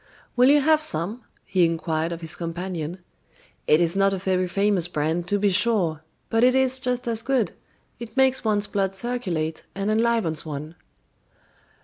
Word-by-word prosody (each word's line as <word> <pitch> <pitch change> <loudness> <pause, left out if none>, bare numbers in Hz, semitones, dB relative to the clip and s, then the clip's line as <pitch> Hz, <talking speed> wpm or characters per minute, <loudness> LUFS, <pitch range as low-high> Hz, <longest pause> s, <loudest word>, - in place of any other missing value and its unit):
"Will 250 +2 +5
you 290 +1 +5
have 310 +2 +3
some?" 205 - +1 0.2
he 185 -2 +2
inquired 165 0 -1
of 170 0 -6
his 160 -2 -2
companion. 175 0 -5 0.6
"It 155 - +5
is 170 +1 +1
not 195 0 +3
a - - -1
very 185 -1 0
famous 195 -1 +1
brand, 165 +1 -2
to 205 - +2
be 200 0 +2
sure; 180 -7 +2 0.3
but 225 +1 +1
it 255 +1 +5
is 260 0 +2
just 250 -1 -2
as 230 -1 0
good, 245 -8 0 0.5
it 235 +2 -9
makes 265 0 +3
one's 210 -2 +1
blood 195 -2 -2
circulate 185 -9 -3
and 200 +2 -1
enlivens 225 -7 +1
one." 155 0 -6
195 Hz, 165 wpm, -24 LUFS, 170-235 Hz, 0.6 s, Will